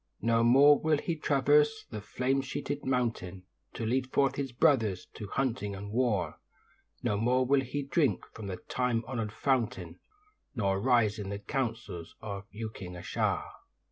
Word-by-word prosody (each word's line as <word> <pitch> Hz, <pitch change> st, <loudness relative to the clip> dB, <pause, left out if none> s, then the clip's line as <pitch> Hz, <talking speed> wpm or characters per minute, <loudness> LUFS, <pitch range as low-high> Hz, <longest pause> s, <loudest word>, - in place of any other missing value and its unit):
No 115 Hz, 0 st, +3 dB
more 140 Hz, +5 st, +7 dB
will 155 Hz, -1 st, +2 dB
he 165 Hz, +3 st, -2 dB
traverse 150 Hz, 0 st, +3 dB
the 110 Hz, -2 st, -5 dB
flame 130 Hz, +6 st, 0 dB
sheeted 140 Hz, +1 st, -4 dB
mountain, 115 Hz, -8 st, -1 dB, 0.3 s
To 115 Hz, -, -3 dB
lead 130 Hz, +3 st, 0 dB
forth 135 Hz, -1 st, +3 dB
his 135 Hz, -2 st, -3 dB
brothers 115 Hz, -, +2 dB
to 105 Hz, -, -7 dB
hunting 105 Hz, -4 st, -1 dB
and 100 Hz, +1 st, -7 dB
war; 110 Hz, -, 0 dB, 0.6 s
No 105 Hz, -, +1 dB
more 125 Hz, +4 st, +2 dB
will 135 Hz, +1 st, +3 dB
he 140 Hz, +3 st, -3 dB
drink 140 Hz, +1 st, +1 dB
from 110 Hz, -3 st, -7 dB
the 95 Hz, -2 st, -4 dB
time 120 Hz, +4 st, -1 dB
honoured 115 Hz, -4 st, -3 dB
fountain, 125 Hz, 0 st, -1 dB, 0.6 s
Nor 100 Hz, -4 st, +1 dB
rise 115 Hz, -3 st, +3 dB
in 100 Hz, -2 st, -4 dB
the 100 Hz, -, -3 dB
councils 115 Hz, -, -4 dB
of 100 Hz, -1 st, -6 dB
Uking 105 Hz, -4 st, -7 dB
a 90 Hz, -, -9 dB
shaa. -, -, 0 dB
120 Hz, 160 wpm, -30 LUFS, 105-135 Hz, 0.6 s, more